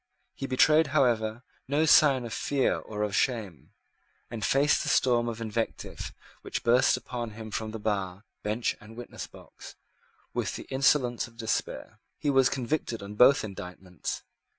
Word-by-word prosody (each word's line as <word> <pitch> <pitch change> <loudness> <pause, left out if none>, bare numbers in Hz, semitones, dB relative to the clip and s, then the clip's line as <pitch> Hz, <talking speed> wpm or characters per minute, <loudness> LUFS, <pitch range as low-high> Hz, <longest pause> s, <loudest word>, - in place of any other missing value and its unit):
He 135 - -5
betrayed, 150 +4 +4
however, 115 -3 +1 0.2
no 145 +4 +2
sign 140 -5 +5
of 115 - -6
fear 140 +3 +1
or 105 -1 -4
of 105 -1 -1
shame, 110 - -1 0.6
and 115 -2 -5
faced 140 +2 +3
the - - -2
storm 120 -2 +3
of 115 -1 -6
invective 115 0 -4 0.3
which - - -4
burst 120 +2 +4
upon 120 -3 -5
him 110 -1 -8
from 110 +1 -3
bar, 100 -3 -3 0.2
bench, 110 +3 -1
and 110 +1 -13
witness 120 - -7
box, - - -13 0.6
with - - -2
the - - -7
insolence 130 -3 +2
of 115 -1 -19
despair. 110 -2 -3 0.2
He 145 - 0
was 135 -2 +4
convicted 125 -4 -2
on 100 +1 -7
both 125 +5 +6
indictments. 90 -3 -6
115 Hz, 150 wpm, -28 LUFS, 110-130 Hz, 0.6 s, both